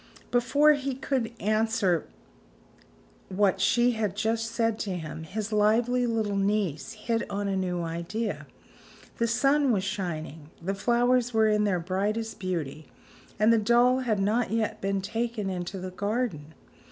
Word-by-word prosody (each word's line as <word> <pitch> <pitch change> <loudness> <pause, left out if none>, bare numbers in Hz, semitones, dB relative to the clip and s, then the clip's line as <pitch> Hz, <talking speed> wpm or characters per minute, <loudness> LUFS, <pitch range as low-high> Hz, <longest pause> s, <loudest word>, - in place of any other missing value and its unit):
Before 285 +5 +4
he 275 -2 -2
could 260 -3 -2
answer 215 -5 +1 1.2
what 190 0 +1
she 240 +5 +4
had 215 -4 -2
just 225 +2 0
said 230 -1 0
to 190 -3 -2
him, 160 -1 -6
his 215 +5 -4
lively 235 +4 +3
little 220 -3 -1
niece 195 -6 0
hit 225 +1 -2
on 200 0 -2
a 195 - 0
new 180 -2 -1
idea. 170 +7 -4 0.7
The 235 - +1
sun 275 +4 +3
was 195 -4 +1
shining, 160 -6 -4
the 190 +4 -2
flowers 240 +3 +2
were 220 0 +5
in 210 0 +2
their 190 -3 +1
brightest 205 +6 -2
beauty 160 -5 -4 0.5
and 215 +2 +5
the 230 - +4
doll 240 +4 +4
had 230 -5 0
not 215 +5 +1
yet 220 -1 -1
been 195 0 0
taken 225 0 -2
into 180 +1 -4
the 185 0 -6
garden! 200 -6 -3
215 Hz, 150 wpm, -27 LUFS, 190-230 Hz, 1.2 s, were